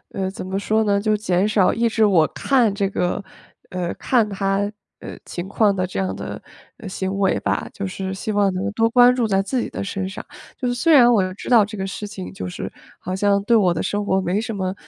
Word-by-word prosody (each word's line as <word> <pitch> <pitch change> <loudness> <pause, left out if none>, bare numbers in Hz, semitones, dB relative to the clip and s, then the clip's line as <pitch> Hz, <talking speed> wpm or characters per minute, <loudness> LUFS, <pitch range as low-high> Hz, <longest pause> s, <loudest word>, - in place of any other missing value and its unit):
呃， 190 -1 -1
怎 185 - -7
么 190 +1 -2
说 220 +2 +1
呢 200 -1 +2
就 215 +1 +1
减 195 -1 +1
少 210 -3 +3
抑 235 +1 +1
制 220 -1 +3
我 175 -6 +4
看 245 -7 +2
这 200 -1 -1
个 180 +1 -1 0.5
呃， 180 -1 -3
看 235 -5 +1
他， 195 0 0 0.4
呃， - - -9
情 175 +1 -5
况 205 0 +2
的 185 -1 0
这 185 - -5
样 190 - -2
的， - - -7 0.4
呃， 225 -4 -9
行 190 +1 -3
为 195 - +2
吧， - - -1
就 200 - -5
是 190 0 -4
希 205 +3 -4
望 200 -2 +2
能 195 +3 -2
多 225 +1 +2
关 245 +1 +6
注 240 -3 0
在 195 -1 +2
自 255 +5 -1
己 - - -4
的 - - -5
身 195 -1 -3
上， 195 - -8 0.3
就 250 - -2
是 245 - 0
虽 250 +7 +1
然 245 -4 +7
我 215 -5 +4
又 185 0 -3
知 205 - -8
道 225 -5 +6
这 215 0 -8
个 190 - -3
事 205 +2 -5
情， 90 - -8
就 95 -1 -6
是 90 - -6 0.3
好 185 - -5
像 200 0 +2
对 235 +2 +3
我 180 -4 +3
的 - - -2
生 205 0 -2
活 190 0 +1
没 185 +3 0
什 225 -1 -4
么， 185 -1 -2
200 Hz, 265 characters per minute, -21 LUFS, 190-220 Hz, 0.5 s, 然